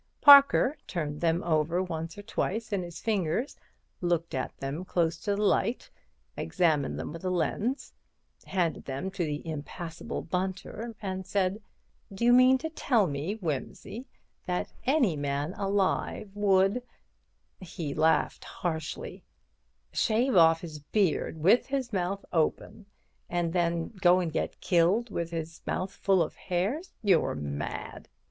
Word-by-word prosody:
Parker 280 0 +8
turned 150 -4 -3
them 170 0 +1
over 170 +2 +1
once 165 -1 -5
or 205 - -8
twice 220 +1 -2
in 195 - +1
his 175 -1 -7
fingers, 210 - -1 0.5
looked 170 -2 0
at 130 -2 -3
them 140 +6 -4
close 170 -3 0
to 200 +4 -1
the 210 - -1
light, 210 +3 +1 0.4
examined 155 -7 +1
them - - -5
with 165 - -9
a 185 - 0
lens, 210 - -1 0.5
handed 175 -4 -1
them 140 +8 -4
to 190 -2 -2
the 150 0 -4
impassible 160 +2 -5
Bunter, 190 +6 -4
and 190 -1 -3
said: 195 +1 0 0.5
"Do 195 +4 -2
you 240 - +6
mean 255 +1 +7
to 320 +4 -4
tell 245 -9 +2
me, 150 +6 -3
Wimsey, 195 - -5 0.4
that 180 0 -2
any 260 - +3
man 145 +3 -2
alive 195 +1 -1
would"—he 195 - -2
laughed 160 +2 +2
harshly—"shave 215 +7 -3
off 165 -2 +6
his 155 -3 -7
beard 165 0 0
with 190 +10 +4
his 265 -4 -2
mouth 190 +1 -2
open, 185 +5 -1 0.4
and 170 -1 -1
then 170 -2 0
go 180 -1 +6
and 170 -4 -2
get - - -2
killed 190 +7 +2
with 170 -3 -2
his 165 -1 -5
mouth 185 +1 -2
full 190 -3 +2
of 155 - -6
hairs? 205 - -2
You're 190 -6 +3
mad." 75 0 -5
180 Hz, 140 wpm, -29 LUFS, 165-205 Hz, 0.5 s, Parker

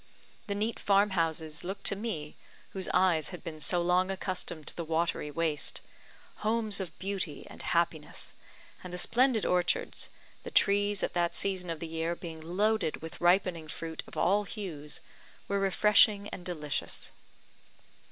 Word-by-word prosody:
The 200 - -1
neat 215 +3 -1
farm 200 0 +4
houses 160 -3 0
looked 195 +2 -5
to - - +5
me, 190 -9 -4 0.4
whose 190 -1 -3
eyes 180 -4 +3
had 180 - -8
been 155 -2 -7
so 175 +3 +2
long 180 +2 +3
accustomed 185 -4 -3
to - - -5
the 170 - -3
watery 165 -1 0
waste, 155 -1 -1 0.6
homes 215 -1 0
of 185 -4 -5
beauty 190 -6 -3
and - - -10
happiness; 170 -3 -1 0.5
and 180 - -7
the 180 - -4
splendid 240 +3 +3
orchards, 180 -1 +1 0.3
the - - -7
trees 205 0 +3
at - - -1
that 175 -1 +1
season 185 -3 0
of 165 -2 -3
the 165 - -4
year 165 +1 -1
being 165 -2 -8
loaded 195 +1 0
with 165 - -8
ripening 175 -2 +3
fruit 160 +1 -5
of - - -11
all 200 +4 +3
hues, 165 -9 -6 0.5
were 200 0 +1
refreshing 205 +1 +5
and 180 - -8
delicious. 150 -5 -2
180 Hz, 155 wpm, -31 LUFS, 165-200 Hz, 0.6 s, to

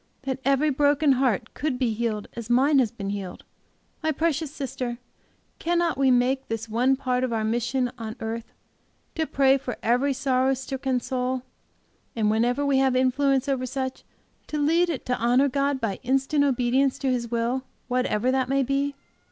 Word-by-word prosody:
that 270 -1 -3
every 275 +2 +2
broken 290 +1 +3
heart 255 -6 +1
could 285 -2 -2
be 250 -3 0
healed 215 -2 -2
as 235 -1 -7
mine 270 +4 +4
has 245 -4 +2
been 200 -3 -5
healed! 195 -3 -6 0.6
My 315 0 +1
precious 315 -1 -1
sister, 255 -4 -4 0.6
cannot 345 0 +1
we 270 -1 +3
make 255 +2 +2
this 225 0 -4
one 245 +4 +2
part 255 -1 -1
of 255 - -1
our 225 -1 0
mission 240 +3 0
on 220 -1 -5
earth, 225 +1 -5 0.6
to 320 -1 -1
pray 270 0 +3
for 250 -1 -5
every 250 +5 +2
sorrow 265 -1 +1
stricken 265 0 -2
soul, 255 0 -2 0.7
and 215 -2 +2
whenever 245 +6 +1
we 275 -1 +3
have 265 -1 +2
influence 265 +1 +2
over 260 -2 -1
such, 260 0 -4 0.4
to 305 - -3
lead 330 +4 +3
it 305 -7 -4
to 250 - 0
honor 245 +4 +3
God 275 0 0
by 215 -6 -2
instant 270 +3 +1
obedience 260 0 +2
to 270 -2 0
His 235 -2 -2
will, 235 +2 0 0.3
whatever 250 -1 +1
that 260 -1 0
may 275 0 +2
be? 275 +2 -1
260 Hz, 175 wpm, -25 LUFS, 240-275 Hz, 0.7 s, mine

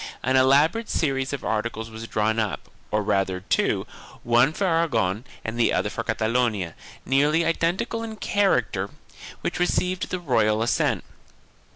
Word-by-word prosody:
An 130 - +2
elaborate 145 +12 +4
series 135 -3 0
of 140 - -5
articles 110 +1 -2
was 110 +1 -7
drawn 110 +1 0
up, 110 -3 -3 0.2
or 105 0 0
rather 95 -2 0
two, - - 0 0.4
one 120 +4 +4
for 195 +5 -2
Aragon 125 - +1 0.2
and 110 +2 -4
the 120 - +4
other - - 0
for - - -4
Cata 110 - -1
lonia, 110 -8 0 0.3
nearly 150 +5 +3
identical 170 +7 0
in 225 -1 -5
character, 125 - +1 0.5
which - - -3
received 180 +1 0
the 180 - -2
royal 110 -8 +2
assent. 115 - +1
125 Hz, 150 wpm, -24 LUFS, 110-165 Hz, 0.5 s, elaborate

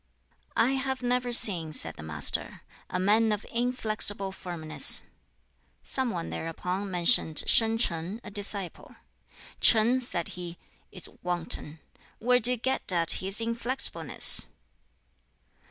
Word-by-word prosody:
"I 245 - +3
have 265 -1 -3
never 245 0 -1
seen," 175 -9 +2
said 80 - -2
the - - -11
Master, 75 -2 0 0.3
"a 180 - -3
man 215 +4 +2
of 210 0 -3
inflexible 215 -5 0
firmness." 170 -4 +3 0.8
Some 260 -2 -3
one 170 -6 -5
thereupon 180 +4 -5
mentioned 175 -3 +4
Shin 225 0 +3
Ch'ang, 180 -1 -3
a - - -10
disciple. 200 -3 -3 0.7
"Ch'ang," 235 +3 +3
said 185 -9 -5
he, 175 -1 -8 0.3
"is 185 - -6
wanton; 165 -3 -3 0.4
where 250 +2 +2
do 240 - +5
you 250 - 0
get 260 -3 -3
at 170 -2 +1
his 195 +3 +2
inflexibleness?" 235 +3 +2
205 Hz, 120 wpm, -27 LUFS, 175-240 Hz, 0.8 s, do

